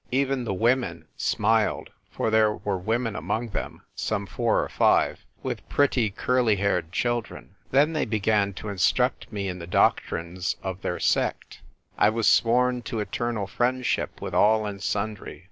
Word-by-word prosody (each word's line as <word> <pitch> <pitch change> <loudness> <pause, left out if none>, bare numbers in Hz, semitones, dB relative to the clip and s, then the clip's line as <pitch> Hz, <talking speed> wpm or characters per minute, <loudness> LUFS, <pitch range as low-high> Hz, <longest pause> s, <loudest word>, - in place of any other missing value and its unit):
Even 135 -1 0
the 100 - -1
women 120 +5 0
smiled 110 0 +1
— - - -41
for 110 - -1
there 110 -1 +4
were 100 -2 -3
women 115 +3 -1
among 115 +2 -2
them, - - -5
some 105 -2 -2
four 115 +1 +1
or - - -4
five, - - +2 0.2
with - - -5
pretty 130 -6 +2
curly 120 +2 +1
haired 95 -4 0
children. 120 +3 -3 0.2
Then 145 +4 +3
they 155 - 0
began 105 -2 +1
to 105 - -6
instruct 120 +6 +1
me 100 -2 -3
in 90 -1 -4
the 85 - -8
doc 90 - +3
trines 85 +1 -3
of 95 -1 -4
their 90 - -3
sect. - - -1 0.4
I 105 - +6
was 110 0 -1
sworn 125 +1 +3
to 115 -1 -4
eternal 115 0 -2
friendship 125 +5 -1
with - - -5
all 110 +1 +4
and 100 -1 -5
sundry. 105 +1 -3
110 Hz, 165 wpm, -25 LUFS, 100-120 Hz, 0.4 s, I